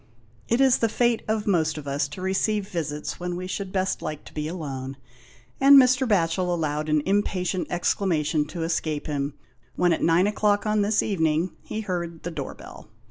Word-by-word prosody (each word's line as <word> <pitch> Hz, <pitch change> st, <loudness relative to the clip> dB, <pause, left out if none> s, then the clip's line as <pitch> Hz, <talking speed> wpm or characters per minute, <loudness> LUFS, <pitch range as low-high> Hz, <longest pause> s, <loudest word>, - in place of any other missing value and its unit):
It 235 Hz, -, +1 dB
is 265 Hz, -2 st, +5 dB
the 230 Hz, -, +2 dB
fate 235 Hz, 0 st, +1 dB
of 220 Hz, -1 st, -1 dB
most 160 Hz, -6 st, +1 dB
of 145 Hz, -2 st, -7 dB
us 140 Hz, +1 st, 0 dB
to 165 Hz, +6 st, -8 dB
receive 195 Hz, +2 st, 0 dB
visits 150 Hz, -5 st, -4 dB
when 180 Hz, 0 st, -3 dB
we 180 Hz, +1 st, -5 dB
should 190 Hz, +1 st, -4 dB
best 190 Hz, 0 st, -1 dB
like 155 Hz, -1 st, -5 dB
to -, -, -13 dB
be 150 Hz, 0 st, -3 dB
alone, 135 Hz, -6 st, -5 dB, 0.6 s
and 280 Hz, +1 st, +8 dB
Mr. 255 Hz, 0 st, +5 dB
Batchel 180 Hz, -3 st, +1 dB
allowed 155 Hz, -2 st, -1 dB
an 150 Hz, -1 st, +2 dB
impatient 185 Hz, -2 st, 0 dB
exclamation 160 Hz, -4 st, 0 dB
to 165 Hz, +2 st, -5 dB
escape 160 Hz, -2 st, -2 dB
him, 145 Hz, -1 st, -3 dB, 0.4 s
when, 175 Hz, -1 st, +3 dB
at -, -, -2 dB
nine 170 Hz, +3 st, +4 dB
o'clock 210 Hz, 0 st, +1 dB
on 215 Hz, 0 st, +2 dB
this 205 Hz, +1 st, +2 dB
evening, 160 Hz, -3 st, 0 dB
he 220 Hz, -, -5 dB
heard 170 Hz, -5 st, -4 dB
the 175 Hz, -, -4 dB
door -, -, -5 dB
bell. -, -, -12 dB
175 Hz, 190 wpm, -25 LUFS, 155-205 Hz, 0.6 s, and